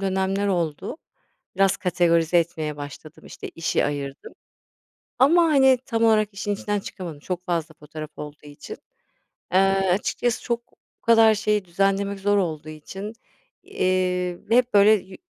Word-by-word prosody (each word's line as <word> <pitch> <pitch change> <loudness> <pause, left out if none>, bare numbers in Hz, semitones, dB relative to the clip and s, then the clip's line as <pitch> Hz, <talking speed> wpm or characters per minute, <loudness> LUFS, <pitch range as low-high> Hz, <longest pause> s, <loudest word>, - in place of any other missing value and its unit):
dönemler 195 +1 0
oldu, 170 - -2 0.6
biraz 195 0 +3
kategorize 175 -2 +2
etmeye 160 -3 -2
başladım, 145 +2 -10
işte, - - -9
işi 165 -1 -1
ayırdım, 140 -1 -5 0.9
ama, 325 +7 +5
hani, 270 -5 +5
tam 230 -2 -1
olarak 215 -2 +4
işin 205 +1 -3
içinden 205 +1 -2
çıkamadım 175 -6 -8
çok 180 +3 -5
fazla 165 -2 -2
fotoğraf 155 +1 -8
olduğu 150 0 -9
için. 145 0 -10 0.8
Eee, - - +6 0.3
açıkçası 230 +5 -1
çok 235 -1 -4
bu - - -38
kadar 225 -1 +6
şeyi 210 -1 0
düzenlemek 195 +2 0
zor 205 +1 +2
olduğu 155 -5 -2
için, 190 +7 -8 0.5
eee, 180 -1 -1
ve 230 - +5
hep 250 -2 +2
böyle 200 +1 +7
yü 190 -3 -1
190 Hz, 140 wpm, -23 LUFS, 165-210 Hz, 0.9 s, böyle